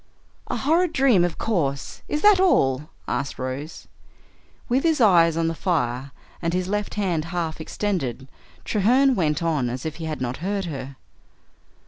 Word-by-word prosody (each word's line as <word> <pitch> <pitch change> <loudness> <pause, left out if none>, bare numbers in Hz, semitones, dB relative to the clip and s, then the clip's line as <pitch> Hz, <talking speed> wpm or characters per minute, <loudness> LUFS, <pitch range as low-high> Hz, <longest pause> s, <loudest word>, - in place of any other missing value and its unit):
"A - - -2
horrid 330 +4 +2
dream, 255 -9 +4
of 175 -2 -1
course. 145 -11 -2
Is 300 - -2
that 415 -2 +7
all?" 150 - +2 0.2
asked 140 - -2
Rose. 130 +5 -6 0.8
With 255 +3 +2
his 320 -2 +2
eyes 170 -7 +5
on 165 0 +1
the 165 - 0
fire 140 -7 -1 0.3
and 170 +1 -1
his 180 0 -1
left 210 +1 -2
hand 180 -7 -1
half 165 -2 -3
extended, 155 - -3 0.4
Treherne 250 +6 +3
went 160 - 0
on 150 -7 0
as 125 +3 -5
if 160 - -4
he 165 - -5
had 155 -1 -4
not 125 0 -3
heard 195 +2 -2
her. 140 -4 -6
170 Hz, 160 wpm, -23 LUFS, 140-210 Hz, 0.8 s, that